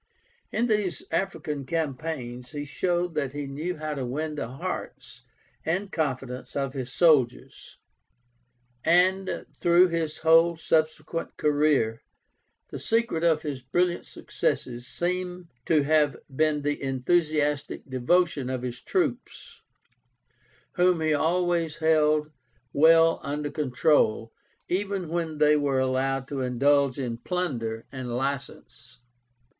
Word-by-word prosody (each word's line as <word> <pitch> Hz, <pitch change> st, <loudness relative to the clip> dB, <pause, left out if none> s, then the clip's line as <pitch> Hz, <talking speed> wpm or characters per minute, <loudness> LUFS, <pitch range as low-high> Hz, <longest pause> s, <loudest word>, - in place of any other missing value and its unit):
In 230 Hz, +3 st, +1 dB
these 210 Hz, -7 st, 0 dB
African 160 Hz, -5 st, -2 dB
campaigns 135 Hz, -5 st, -4 dB
he 145 Hz, 0 st, -4 dB
showed 175 Hz, +4 st, -1 dB
that 140 Hz, -4 st, -2 dB
he 145 Hz, 0 st, -4 dB
knew 155 Hz, +6 st, -4 dB
how 155 Hz, 0 st, -3 dB
to 135 Hz, -3 st, -4 dB
win 150 Hz, +5 st, -3 dB
the 150 Hz, -, -4 dB
hearts 160 Hz, +10 st, -6 dB, 0.4 s
and 190 Hz, +5 st, -1 dB
confidence 130 Hz, -5 st, -3 dB
of 135 Hz, -2 st, -2 dB
his 130 Hz, -3 st, -5 dB
soldiers; 140 Hz, -7 st, +1 dB, 1.1 s
and 185 Hz, +3 st, +2 dB
through 175 Hz, +1 st, +4 dB
his 165 Hz, -2 st, -2 dB
whole 165 Hz, +1 st, +4 dB
subsequent 155 Hz, 0 st, -1 dB
career, 145 Hz, -7 st, +2 dB, 0.7 s
the -, -, -5 dB
secret 225 Hz, -7 st, 0 dB
of 160 Hz, -2 st, +3 dB
his 145 Hz, -4 st, -4 dB
brilliant 175 Hz, +7 st, 0 dB
successes 120 Hz, 0 st, -3 dB
seems 180 Hz, +2 st, -3 dB, 0.2 s
to 155 Hz, -3 st, +3 dB
have 150 Hz, -2 st, +2 dB, 0.2 s
been 155 Hz, 0 st, +1 dB
the 145 Hz, 0 st, -1 dB
enthusiastic 145 Hz, +2 st, 0 dB
devotion 135 Hz, +1 st, +1 dB
of 130 Hz, -1 st, -3 dB
his 125 Hz, -1 st, -5 dB
troops, -, -, -3 dB, 1.2 s
whom 180 Hz, -1 st, +4 dB
he 155 Hz, -1 st, +2 dB
always 170 Hz, +1 st, +1 dB
held 155 Hz, -1 st, +2 dB, 0.4 s
well 165 Hz, +2 st, +5 dB
under 145 Hz, +1 st, -3 dB
control, 140 Hz, -6 st, +1 dB, 0.3 s
even 195 Hz, -1 st, -2 dB
when 165 Hz, -2 st, -2 dB
they 150 Hz, 0 st, +5 dB
were 145 Hz, -2 st, +1 dB
allowed 130 Hz, 0 st, 0 dB
to 140 Hz, -2 st, -4 dB
indulge 135 Hz, +2 st, +2 dB
in 120 Hz, -4 st, -3 dB
plunder 120 Hz, -10 st, -3 dB
and 125 Hz, -3 st, -5 dB
license. 130 Hz, -2 st, -5 dB
150 Hz, 120 wpm, -26 LUFS, 135-170 Hz, 1.2 s, well